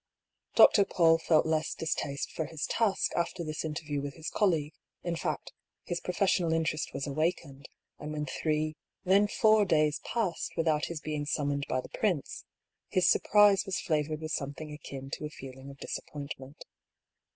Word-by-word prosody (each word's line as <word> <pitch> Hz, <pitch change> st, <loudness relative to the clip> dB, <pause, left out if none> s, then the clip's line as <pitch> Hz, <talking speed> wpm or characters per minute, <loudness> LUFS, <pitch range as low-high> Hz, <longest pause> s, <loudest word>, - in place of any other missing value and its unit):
Dr. 200 Hz, -, +8 dB
PauU 165 Hz, -4 st, +3 dB
felt 160 Hz, -1 st, +4 dB
less 160 Hz, 0 st, 0 dB
distaste 145 Hz, -3 st, -2 dB
for 160 Hz, -, -3 dB
his 160 Hz, -2 st, -4 dB
task 215 Hz, -4 st, +1 dB
after 170 Hz, 0 st, -1 dB
this 155 Hz, -1 st, -4 dB
interview 150 Hz, -2 st, -3 dB
with 140 Hz, 0 st, -5 dB
his 160 Hz, -1 st, -6 dB
colleague: 160 Hz, -8 st, +1 dB, 0.3 s
in 175 Hz, -1 st, -1 dB
fact, -, -, -3 dB, 0.3 s
his 175 Hz, -, -3 dB
professional 180 Hz, -2 st, +1 dB
interest 160 Hz, -1 st, -1 dB
was 135 Hz, -, -3 dB
awakened; 145 Hz, -2 st, -2 dB, 0.3 s
and 150 Hz, -, -6 dB
when 150 Hz, -1 st, -2 dB
three, 155 Hz, +2 st, -1 dB, 0.3 s
then 195 Hz, +3 st, +4 dB
four 215 Hz, 0 st, +4 dB
days 155 Hz, -5 st, +2 dB
passed 215 Hz, -8 st, -2 dB
without 160 Hz, -2 st, +2 dB
his 165 Hz, -2 st, -5 dB
being 150 Hz, -1 st, -3 dB
summoned 140 Hz, -1 st, -1 dB
by 130 Hz, -, 0 dB
the -, -, -12 dB
prince, 180 Hz, -10 st, -2 dB, 0.4 s
his 185 Hz, -1 st, +2 dB
surprise 205 Hz, -1 st, +5 dB
was 195 Hz, 0 st, -1 dB
flavoured 155 Hz, -2 st, -1 dB
with 155 Hz, 0 st, -4 dB
something 150 Hz, +1 st, -4 dB
akin 135 Hz, -2 st, -8 dB
to -, -, -4 dB
a -, -, -4 dB
feeling 135 Hz, -2 st, -10 dB
of 140 Hz, -, -11 dB
disappointment. 140 Hz, -1 st, -7 dB
155 Hz, 160 wpm, -30 LUFS, 145-170 Hz, 0.4 s, Dr